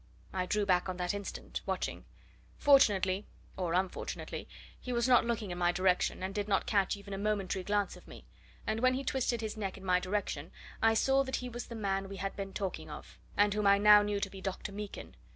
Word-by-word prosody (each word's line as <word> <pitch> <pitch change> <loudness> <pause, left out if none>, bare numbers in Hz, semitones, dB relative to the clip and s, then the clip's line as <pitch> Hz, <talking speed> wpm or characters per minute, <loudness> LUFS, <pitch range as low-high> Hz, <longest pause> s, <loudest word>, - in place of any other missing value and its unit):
I 185 -1 -1
drew 210 +2 +1
back 180 -1 +2
on 185 - -3
the 180 -1 -2
instant, 200 -1 -5
watching. - - -2 0.5
Fortunately 205 -8 +4 0.3
or 180 -3 -2
unfortunately 185 0 -3 0.3
he 250 - -6
was 235 0 +1
not 250 -2 +5
looking 225 -5 -2
in 175 - -4
my 175 0 +3
direction, 185 0 +1
and 190 +1 -3
did 205 0 -2
not 195 -2 +2
catch 200 -1 +1
even 200 0 -9
a 195 - -3
momentary 200 -2 -1
glance 205 0 0
of - - -15
me, - - -12 0.4
and 220 +1 -1
when 255 +1 +3
he 270 - -2
twisted 250 -3 0
his 220 -1 -3
neck 195 -3 -4
in 195 - -11
my 180 -1 +4
direction 185 -5 -3 0.3
I 225 0 +4
saw 270 +4 +4
that 265 - -2
he 250 - -4
was 240 0 -6
the 235 - -7
man 195 -2 -1
we 195 - -7
had 195 +1 -3
been 195 -1 -5
talking 180 -6 -4
of, 150 - -10 0.2
and 205 0 +4
whom 210 -1 +1
I 200 0 +7
now 210 0 +8
knew 205 0 -1
to 195 - -1
be 195 - -9
Dr. 190 +1 -4
Meekin. 205 0 -7
200 Hz, 225 wpm, -32 LUFS, 190-215 Hz, 0.5 s, now